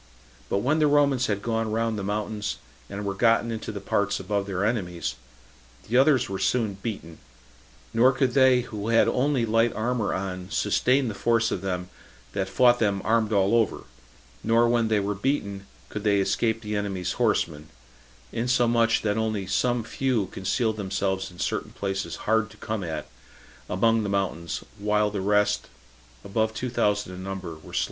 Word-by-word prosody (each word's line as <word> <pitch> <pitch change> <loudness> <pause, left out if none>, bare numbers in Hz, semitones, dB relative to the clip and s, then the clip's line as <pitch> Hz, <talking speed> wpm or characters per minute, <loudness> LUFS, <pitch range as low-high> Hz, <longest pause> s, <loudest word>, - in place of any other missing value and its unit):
But 100 - 0
when 150 +5 +2
the 150 - +4
Romans 140 -3 +3
had 100 -1 -2
gone 115 -1 -1
round 115 0 0
the 105 - -3
mountains, 105 0 -3 0.3
and 100 +1 -5
were 100 - -1
gotten 115 +2 +2
into 110 -1 -4
the 105 - -5
parts 100 +1 0
above 100 -1 -2
their 100 0 -1
enemies, 90 -7 -2 0.7
the 115 - -2
others 130 -1 +4
were 95 -2 -4
soon 115 -5 +1
beaten; 95 -8 -6 0.7
nor 125 +3 +5
could 130 -1 0
they 130 -1 +5
who 105 -3 -6
had 115 0 +4
only 130 -2 +1
light 115 +1 +2
armor 115 -1 0
on 90 -1 -4
sustain 125 +6 +2
the 110 - -3
force 115 +2 +1
of 90 - -2
them 90 -2 -3 0.5
that 95 -1 -2
fought 120 +5 +4
them 100 -3 +1
armed 110 -1 +2
all 100 0 +3
over; 115 -4 +1 0.6
nor 115 +1 +4
when 115 -1 +2
they 110 -1 +2
were 100 +1 -1
beaten 100 -4 -2 0.2
could 105 - -5
they 100 -2 +3
escape 110 +3 0
the 105 0 -3
enemies' 95 -3 -2
horsemen; 75 -1 0 0.6
insomuch 120 -1 +2
that 105 0 0
only 110 -3 -1
some 120 +5 +1
few 120 -2 0
concealed 110 +3 -1
themselves 95 -1 -2
in 90 - -15
certain - - -2
places 100 0 -3
hard 110 -1 +2
to - - -16
be - - -12
come 110 -2 -2
at, 80 -3 -4 0.6
among 115 +4 +2
the 105 - -2
mountains, 85 -4 -2 0.2
while 105 0 +1
the 100 -2 -3
rest, 105 +1 +2 0.6
above 110 +2 0
two 125 -1 -3
thousand 105 -5 0
in 90 +1 -7
number, 95 -3 -5
were 80 - -14
slain. - - 0
105 Hz, 175 wpm, -26 LUFS, 100-115 Hz, 0.7 s, nor